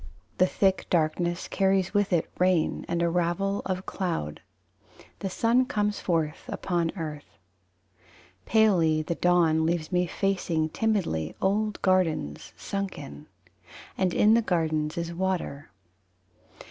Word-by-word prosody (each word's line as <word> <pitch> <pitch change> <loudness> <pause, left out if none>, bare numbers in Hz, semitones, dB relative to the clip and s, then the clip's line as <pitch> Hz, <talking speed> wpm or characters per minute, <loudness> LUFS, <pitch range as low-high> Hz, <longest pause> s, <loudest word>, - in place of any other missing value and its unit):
The 185 - +5
thick 190 0 +1
darkness 175 +1 0
carries 195 -1 +1
with 205 -1 +1
it 170 -3 +2
Rain 180 -3 +2
and 170 0 0
a - - +3
ravel 180 +4 0
of 185 0 -3
cloud. 165 - -3 0.8
The 195 - -3
sun 235 +6 +2
comes 210 -2 -1
forth 160 -3 -1
upon 170 -3 -1
earth. 150 -3 -7 1.1
Palely 175 -8 +3
the 170 - -2
dawn 170 -2 +3
Leaves 160 -1 -1
me 180 0 +1
facing 175 -5 -1
timidly 175 - -1
Old 210 +2 0
gardens 170 - 0
sunken: 185 - -5 0.7
And 185 -1 +1
in 210 +5 +4
the 230 - +5
gardens 160 -4 -1
is 170 0 -3
water. 175 -5 -3
175 Hz, 120 wpm, -27 LUFS, 160-195 Hz, 1.1 s, The